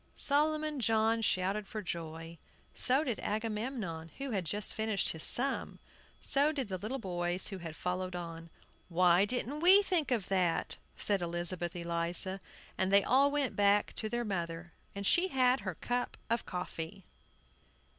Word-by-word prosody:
Solomon 305 0 +3
John 225 0 +2
shouted 195 0 -1
with 215 -2 -5
joy; 165 -1 -6 0.3
so 265 +4 +3
did 245 -7 -3
Agamemnon, 210 -6 -4
who 275 -1 -5
had 195 -5 -2
just 205 +5 -2
finished 220 -3 -1
his 160 - -2
sum; 265 - +3 0.4
so 285 +2 +2
did 270 -8 -4
the 185 -1 -3
little 220 +8 -4
boys, 175 -4 -2
who 195 -2 -6
had 165 -2 -8
followed 180 +1 -3
on. 165 -1 -7 0.4
"Why 180 +2 +4
didn't 255 +5 -1
we 375 +5 +7
think 345 -7 0
of 230 -7 -1
that?" 180 -3 0 0.2
said 200 -3 0
Elizabeth 175 0 +1
Eliza; 170 +2 -1 0.4
and 190 0 +1
they 200 0 +6
all 275 +2 +4
went 285 -2 -1
back 205 0 +2
to 215 - -3
their 240 +1 -2
mother, 170 -4 -4 0.2
and 200 0 -5
she 350 - +4
had 255 -5 +2
her 190 -5 -5
cup 245 +6 -3
of 230 - -1
coffee. 180 0 -6
200 Hz, 155 wpm, -32 LUFS, 175-250 Hz, 0.4 s, we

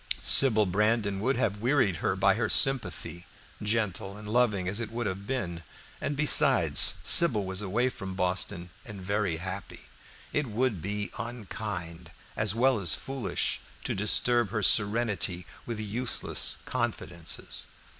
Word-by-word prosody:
Sybil 110 -6 +7
Brandon 105 +1 -1
would 130 +7 -1
have 105 -4 -2
wearied 120 - +1
her 90 - -2
by 95 0 +2
her 115 +4 -2
sympathy, 90 - 0 0.3
gentle 105 -2 -3
and 105 0 -10
loving 105 -5 0
as 100 +4 -2
it 115 -2 -6
would 120 0 -4
have 100 0 -5
been; 90 -11 -4 0.4
and 145 - -3
besides, 150 0 +6
Sybil 115 - +7
was 95 +1 -4
away 105 +6 -1
from 95 -6 -8
Boston 90 -1 -2
and 105 -4 -10
very 95 -2 -2
happy; 95 +2 -8 0.5
it 150 -2 -1
would 115 -4 -2
be 105 +2 -5
unkind, 100 -7 -7 0.3
as 110 -1 -1
well 125 0 +2
as 90 -5 -1
foolish, 135 -2 -4 0.2
to - - -3
disturb 115 +2 +1
her 110 0 -3
serenity 105 -5 +1 0.2
with 115 -2 -5
useless 110 +4 -1
confidences. 85 0 -5
105 Hz, 140 wpm, -27 LUFS, 95-120 Hz, 0.5 s, Sybil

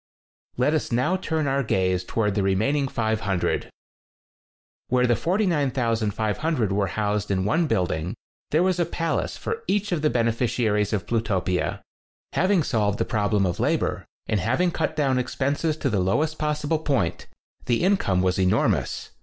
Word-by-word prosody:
Let 130 +5 +2
us 155 - -1
now 130 +10 +2
turn 160 -4 -1
our 140 0 +1
gaze 95 -6 +1
towards 105 +2 0
the 100 - 0
re 95 0 +2
maining 140 +7 +1
500. 110 -6 -1 1.2
Where 125 0 +2
the 120 -1 +3
49,500 125 - 0
were 100 0 +1
housed 105 +2 -1
in 95 -1 0
one 160 +11 +2
building, 90 - -1 0.3
there 155 +4 +3
was 185 -1 +1
a 175 - +3
palace 165 -1 -2
for 455 0 -4
each 205 0 0
of 170 -4 0
the 150 - +3
beneficiaries 115 -3 +1
of 105 -4 -1
Plutopia. 95 -6 -1 0.5
Having 185 -2 +3
solved 105 -6 0
the - - 0
problem 105 -2 +1
of 90 - -2
labor, - - 0 0.2
and 105 - 0
having 130 - +1
cut 160 -1 -2
down 135 -4 +1
expenses 145 +5 -1
to - - -1
the 105 - +1
lowest 150 +13 0
possible 150 +1 0
point, 135 - -1 0.4
the 120 +4 +1
income 100 - +2
was 95 0 +1
enormous. 95 -1 +1
120 Hz, 155 wpm, -24 LUFS, 105-155 Hz, 1.2 s, the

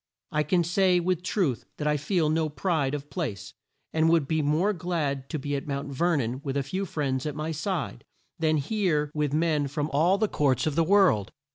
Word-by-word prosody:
I 150 - +1
can 170 +4 +2
say 180 +1 +3
with 180 0 0
truth 180 - -1
that 150 - -4
I 150 - +3
feel 155 +3 +1
no 160 0 +1
pride 150 -1 0
of 145 0 -8
place, 100 - -4 0.4
and 160 0 +3
would 165 -4 +3
be 160 +1 +1
more 155 +8 +2
glad 155 -7 -2
to 160 - -2
be 145 0 -3
at 140 - -4
Mount 140 0 -3
Ver 170 +5 +1
non 125 0 -2
with 140 -2 -2
a 140 - 0
few 190 +8 -3
friends 135 -3 -2
at 150 - -4
my 155 +1 -3
side, 160 - -3 0.4
than 155 -1 +2
here 150 -3 0
with 150 -2 0
men 155 -2 +1
from 150 +2 -3
all 170 +7 +4
the 215 +1 +1
courts 140 - +1
of 155 - 0
the 165 +3 +3
world." 175 - +3
155 Hz, 215 wpm, -27 LUFS, 140-175 Hz, 0.4 s, all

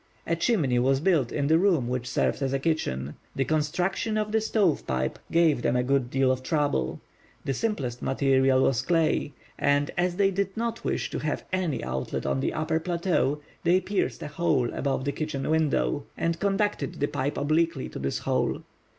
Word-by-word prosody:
A 170 - +1
chimney 165 - +2
was 135 +2 +3
built 155 -7 +2
in 145 - -1
the 160 +3 +4
room 170 -10 +2
which 125 0 -2
served - - 0
as 135 -1 0
a 135 - +1
kitchen. 75 - -2 0.2
The 135 - +1
construction 175 +8 0
of 210 0 -1
the 220 0 +2
stove 205 -7 +1
pipe 65 0 -1
gave 165 -6 +3
them 120 - +1
a 125 - +2
good 135 -1 +1
deal 135 0 +2
of 130 0 -1
trouble. 145 - 0 0.5
The 135 - 0
simplest 135 - -2
material 135 -1 +3
was 125 -3 +2
clay; 160 -1 +1 0.3
and 145 0 +2
as 175 0 +1
they 195 0 +3
did 195 +1 -2
not 230 0 -2
wish - - -2
to - - -3
have 155 -1 -3
any 185 -5 -1
outlet 65 0 -3
on 70 0 0
the - - 0
upper 155 +1 0
plateau, 170 -4 0 0.2
they 175 +2 +4
pierced 185 - -2
a - - -4
hole 150 -5 0
above 135 -1 -1
the 140 - +1
kitchen 145 -3 -3
window, 155 - +1
and 165 0 -1
conducted 200 -7 0
the 145 - 0
pipe 140 +1 -2
obliquely 155 0 +1
to - - -7
this 70 0 -1
hole. - - -1
150 Hz, 190 wpm, -27 LUFS, 130-175 Hz, 0.5 s, the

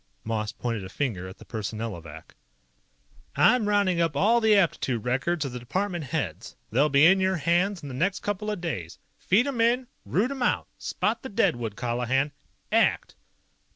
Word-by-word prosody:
Moss 110 -2 -2
pointed 115 -3 -3
a 95 - -8
finger 95 -6 -3
at 95 - -10
the - - -14
Personnelovac. 105 -8 -6 1.0
"I'm 230 -2 +4
rounding 195 -4 +2
up 165 -4 0
all 230 +8 +4
the 220 -1 +5
aptitude 135 - +1
records 140 +6 0
of 135 - -4
the 125 - -6
department 175 +6 -2
heads. 125 - -4 0.2
They'll 140 +7 +3
be 140 +2 +5
in 190 +3 +6
your 190 0 +2
hands 175 +3 +1
in - - -6
the 135 - -7
next 185 +9 0
couple 205 +1 -3
of 210 -3 -2
days. 95 - -4 0.2
Feed 215 +7 +3
'em 270 -5 -1
in! 245 +3 +3 0.2
Root 230 +8 0
'em 275 -2 -5
out! 245 - +1
Spot - - -1
the 265 - -7
deadwood, 120 - 0
Colihan! 125 +5 0 0.4
ACT!" - - +2
150 Hz, 175 wpm, -26 LUFS, -, 1.0 s, in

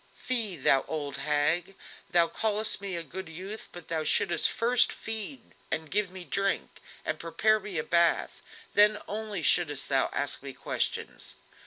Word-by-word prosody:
"Fie, 230 -7 -1
thou 135 -2 +4
old 145 -3 -3
hag! 155 +6 0 0.3
thou 170 -3 +4
call'st 215 0 +1
me 195 -2 -4
a 170 - -2
good 185 +1 -8
youth, 190 +7 -7
but 175 -2 -11
thou 160 -1 -2
shouldst 170 +3 +4
first 240 +1 +3
feed 225 +4 -6 0.2
and 160 -1 -3
give 205 -1 +1
me 185 0 -9
drink, 195 +2 -2 0.2
and - - -2
prepare 215 +6 +1
me 200 -4 -5
a 155 - 0
bath, 170 +1 +1 0.3
then 210 +1 +6
only 210 -4 -3
shouldst 150 -2 +2
thou 135 -1 +2
ask 145 - 0
me 140 -1 -7
questions." - - -3
180 Hz, 160 wpm, -28 LUFS, 160-210 Hz, 0.3 s, then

